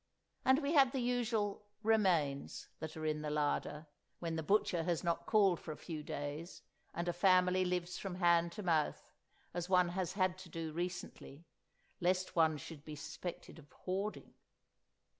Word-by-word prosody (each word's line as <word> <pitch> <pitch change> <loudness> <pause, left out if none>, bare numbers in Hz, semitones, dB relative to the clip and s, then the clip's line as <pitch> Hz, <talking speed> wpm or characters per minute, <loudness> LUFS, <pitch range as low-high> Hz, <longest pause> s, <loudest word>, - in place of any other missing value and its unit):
and 265 +3 +4
we 285 +3 +1
had 275 -4 +6
the 270 - 0
usual 230 -5 0 0.2
"remains" 180 -11 +1
that 160 0 -6
are 155 - -4
in 155 -1 0
the 150 - -3
larder, 150 +1 -1 0.3
when 165 -1 -3
the 160 - -1
butcher 175 0 +2
has 170 -1 -1
not 170 0 -1
called 195 -5 +4
for 160 - -7
a 150 - -7
few 160 -3 -6
days 145 +3 -5 0.3
and 170 +1 -2
a 175 - +1
family 185 +1 +4
lives 180 -1 -2
from 195 -3 -4
hand 170 -1 +4
to 210 +3 -6
mouth, 160 -4 0 0.4
as 175 0 -3
one 180 -2 +4
has 180 -1 -2
had 185 -1 +1
to 185 -2 -10
do 165 -1 -5
recently, 175 -3 -5 0.5
lest 185 +1 +1
one 160 -2 +4
should 145 +1 -9
be 155 -1 -7
suspected 175 +3 -7
of 145 -2 -17
hoarding! 195 +3 -4
175 Hz, 170 wpm, -36 LUFS, 160-190 Hz, 0.5 s, had